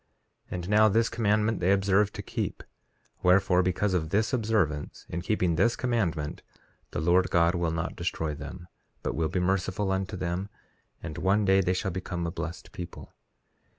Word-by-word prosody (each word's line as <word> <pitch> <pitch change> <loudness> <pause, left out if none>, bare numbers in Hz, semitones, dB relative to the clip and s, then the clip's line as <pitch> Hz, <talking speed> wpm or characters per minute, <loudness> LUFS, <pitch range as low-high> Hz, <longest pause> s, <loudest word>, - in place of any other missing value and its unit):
3:6 - - -34
And 90 +1 -5
now, 110 +1 +6
this 115 +2 +2
commandment 110 -1 +1
they 90 +2 +2
observe 100 +1 +3
to 100 - -6
keep; - - -4 0.6
wherefore, 90 0 +4
because 95 +2 0
of 80 -3 0
this 110 +6 +1
observance, 105 - 0
in 85 - -3
keeping 90 -3 +1
this 115 +6 +3
commandment, 90 -12 -1 0.5
the - - -3
Lord 90 +3 +3
God 85 0 +3
will 85 -2 0
not 85 +1 -3
destroy 80 -3 -2
them, 75 +4 -8 0.4
but - - -1
will 80 +1 0
be 90 - -1
merciful 95 +2 0
unto 95 0 -2
them; 90 +2 -2 0.5
and 75 - -5
one 100 +2 +2
day 95 0 +5
they 90 0 +1
shall 95 +1 -1
become 90 -1 -4
a 85 - -2
blessed 85 +2 -6
people. 90 -3 -9
95 Hz, 175 wpm, -28 LUFS, 85-105 Hz, 0.6 s, now